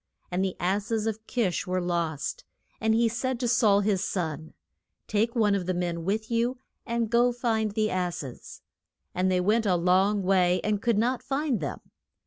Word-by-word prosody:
And 180 Hz, +2 st, 0 dB
the 190 Hz, -1 st, -1 dB
ass 195 Hz, +5 st, -1 dB
es 220 Hz, -2 st, 0 dB
of 220 Hz, 0 st, -4 dB
Kish 205 Hz, -6 st, -1 dB
were 185 Hz, 0 st, 0 dB
lost. 170 Hz, -, -2 dB, 0.4 s
And 220 Hz, 0 st, +2 dB
he 230 Hz, +1 st, +3 dB
said 240 Hz, +2 st, -2 dB
to 250 Hz, -, 0 dB
Saul, 215 Hz, -4 st, +4 dB
his 195 Hz, -2 st, +1 dB
son, 160 Hz, -4 st, -3 dB, 0.5 s
Take 220 Hz, +3 st, 0 dB
one 215 Hz, -3 st, +3 dB
of 190 Hz, -3 st, -1 dB
the 185 Hz, -, 0 dB
men 175 Hz, -1 st, -2 dB
with 215 Hz, +4 st, -1 dB
you, 235 Hz, +2 st, +1 dB, 0.3 s
and 235 Hz, -1 st, 0 dB
go 240 Hz, +2 st, +3 dB
find 225 Hz, -3 st, -1 dB
the 215 Hz, 0 st, 0 dB
ass 180 Hz, -3 st, -2 dB
es. 130 Hz, -3 st, -10 dB, 0.5 s
And 185 Hz, +1 st, +1 dB
they 180 Hz, -, +2 dB
went 215 Hz, +4 st, +2 dB
a 185 Hz, -, +3 dB
long 190 Hz, +4 st, +2 dB
way 180 Hz, -1 st, +3 dB
and 210 Hz, -1 st, 0 dB
could 235 Hz, -1 st, +1 dB
not 245 Hz, +4 st, +1 dB
find 275 Hz, -4 st, -1 dB
them. 145 Hz, -, -4 dB
205 Hz, 190 wpm, -27 LUFS, 180-230 Hz, 0.5 s, Saul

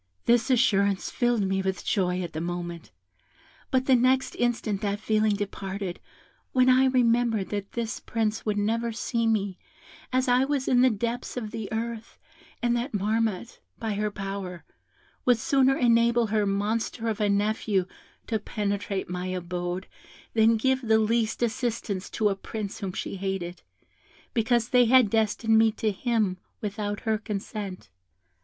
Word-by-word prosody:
"This 240 Hz, +1 st, +3 dB
assurance 200 Hz, -6 st, +2 dB
filled 240 Hz, -3 st, +1 dB
me 190 Hz, 0 st, 0 dB
with 190 Hz, -1 st, -3 dB
joy 180 Hz, -2 st, +1 dB
at 175 Hz, -, -6 dB
the 155 Hz, -, -3 dB
moment; 175 Hz, -1 st, -5 dB, 0.8 s
but 260 Hz, 0 st, +1 dB
the 265 Hz, -, +4 dB
next 255 Hz, +2 st, +2 dB
instant 230 Hz, -4 st, 0 dB
that 205 Hz, -1 st, -1 dB
feeling 215 Hz, -1 st, +2 dB
departed, 195 Hz, -2 st, -4 dB, 0.5 s
when 255 Hz, 0 st, +4 dB
I 255 Hz, +1 st, +6 dB
remembered 235 Hz, -5 st, +2 dB
that 205 Hz, -1 st, -4 dB
this 235 Hz, -1 st, -3 dB
Prince 220 Hz, -1 st, -2 dB
would 210 Hz, -1 st, -1 dB
never 230 Hz, +3 st, 0 dB
see 230 Hz, +1 st, -1 dB
me, 200 Hz, -4 st, 0 dB, 0.5 s
as 255 Hz, +1 st, +1 dB
I 250 Hz, +1 st, +4 dB
was 275 Hz, -1 st, -1 dB
in 245 Hz, -1 st, +4 dB
the 260 Hz, -, +6 dB
depths 235 Hz, +3 st, -3 dB
of 220 Hz, -4 st, -4 dB
the 220 Hz, -3 st, -5 dB
earth, 225 Hz, 0 st, -4 dB, 0.5 s
and 240 Hz, 0 st, +2 dB
that 240 Hz, +3 st, -2 dB
Marmotte, 220 Hz, +1 st, -1 dB, 0.2 s
by 220 Hz, -2 st, -2 dB
her 210 Hz, +1 st, -1 dB
power, 195 Hz, -3 st, -6 dB, 0.6 s
would 245 Hz, -2 st, +4 dB
sooner 270 Hz, +3 st, +3 dB
enable 235 Hz, -1 st, +4 dB
her 210 Hz, -1 st, +1 dB
monster 215 Hz, +3 st, -1 dB
of 220 Hz, -1 st, -1 dB
a 205 Hz, -, +2 dB
nephew 205 Hz, -1 st, +1 dB, 0.4 s
to 220 Hz, -2 st, -1 dB
penetrate 205 Hz, -2 st, -2 dB
my 180 Hz, +1 st, -4 dB
abode 180 Hz, 0 st, -3 dB, 0.5 s
than 225 Hz, 0 st, +4 dB
give 260 Hz, +3 st, +1 dB
the 220 Hz, -3 st, +3 dB
least 220 Hz, +1 st, +1 dB
assistance 225 Hz, -4 st, -2 dB
to 215 Hz, -2 st, +1 dB
a 195 Hz, -, 0 dB
prince 205 Hz, +1 st, -6 dB
whom 195 Hz, -2 st, -3 dB
she 195 Hz, -, -4 dB
hated, 185 Hz, -2 st, -4 dB, 0.7 s
because 235 Hz, 0 st, +1 dB
they 250 Hz, -1 st, +5 dB
had 245 Hz, -3 st, +5 dB
destined 220 Hz, 0 st, +3 dB
me 225 Hz, 0 st, +5 dB
to 215 Hz, -1 st, 0 dB
him 210 Hz, -3 st, 0 dB, 0.2 s
without 205 Hz, 0 st, -3 dB
her 220 Hz, -2 st, 0 dB
consent. 200 Hz, -, -6 dB
220 Hz, 155 wpm, -27 LUFS, 200-235 Hz, 0.8 s, I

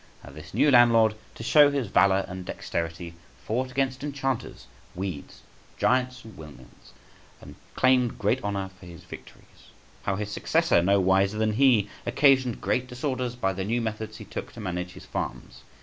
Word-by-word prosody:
How 70 Hz, -, -11 dB
this 75 Hz, +2 st, -12 dB
new 150 Hz, -, +3 dB
landlord, 115 Hz, -3 st, +6 dB, 0.2 s
to -, -, -8 dB
show 145 Hz, +4 st, +6 dB
his 140 Hz, -3 st, -1 dB
valour 95 Hz, 0 st, +3 dB
and 90 Hz, 0 st, -7 dB
dexterity, 85 Hz, -1 st, -5 dB, 0.3 s
fought 125 Hz, +4 st, -1 dB
against 130 Hz, 0 st, -2 dB
enchanters, 135 Hz, -3 st, -3 dB, 0.3 s
weeds, 90 Hz, -5 st, -6 dB, 0.3 s
giants, 125 Hz, 0 st, 0 dB
and 110 Hz, -, -12 dB
windmills, 70 Hz, -5 st, -14 dB, 0.5 s
and -, -, -12 dB, 0.2 s
claimed 130 Hz, -2 st, +3 dB
great 105 Hz, +6 st, 0 dB
honour 100 Hz, -2 st, -3 dB
for 90 Hz, -, -13 dB
his 85 Hz, -2 st, -12 dB
victories. -, -, -13 dB, 0.6 s
How 100 Hz, -, -1 dB
his 105 Hz, +1 st, -4 dB
successor, 85 Hz, -, +2 dB
no 100 Hz, +3 st, +3 dB
wiser 95 Hz, +2 st, +2 dB
than 110 Hz, 0 st, +1 dB
he, 120 Hz, -4 st, +4 dB, 0.2 s
occasioned 130 Hz, -1 st, +3 dB
great 125 Hz, 0 st, 0 dB
disorders 125 Hz, -1 st, -3 dB
by 95 Hz, -6 st, -1 dB
the 95 Hz, 0 st, -4 dB
new 115 Hz, +5 st, 0 dB
methods 110 Hz, -1 st, -4 dB
he -, -, -10 dB
took -, -, -7 dB
to -, -, -11 dB
manage 90 Hz, -3 st, -4 dB
his -, -, -12 dB
farms. 65 Hz, 0 st, -6 dB
110 Hz, 165 wpm, -26 LUFS, 95-125 Hz, 0.6 s, landlord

